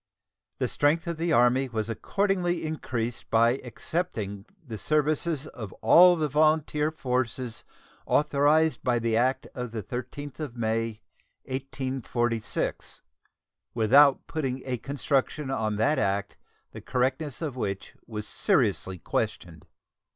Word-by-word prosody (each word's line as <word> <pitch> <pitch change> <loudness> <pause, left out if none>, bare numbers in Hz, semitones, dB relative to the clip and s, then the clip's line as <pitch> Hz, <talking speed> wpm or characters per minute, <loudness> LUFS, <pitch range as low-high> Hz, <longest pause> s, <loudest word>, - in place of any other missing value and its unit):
The - - 0
strength 155 +5 +1
of 170 -2 -3
the 165 +1 -1
Army 125 0 +4
was 110 -2 -2
accordingly 180 - 0
increased 120 -7 -3
by 115 +3 +4
"accepting" 110 - -4 0.2
the 110 -5 -7
services 155 - +1
of 110 -9 -8
all 180 +1 +7
the 155 -2 0
volunteer 150 +1 +2
forces 125 -5 -2 0.4
authorized 150 +2 +3
by 125 -2 +2
the 115 -1 0
act 130 +3 +1
of 125 -1 -4
the 110 -2 -5
13th 130 +4 -6
of 145 -6 -5
May, 115 -1 -1 0.4
1846, 130 -3 -3 0.7
without 135 +5 +5
putting 135 -5 -3
a 125 -2 -2
construction 140 +1 -1
on 110 -5 -1
that 110 +9 +2
act 100 +1 -1 0.4
the - - -9
correctness 130 +3 -1
of 150 -6 -4
which 100 -6 -4
was 105 -2 -5
seriously 95 -1 +1
questioned. 85 -2 -3
130 Hz, 120 wpm, -27 LUFS, 115-150 Hz, 0.7 s, all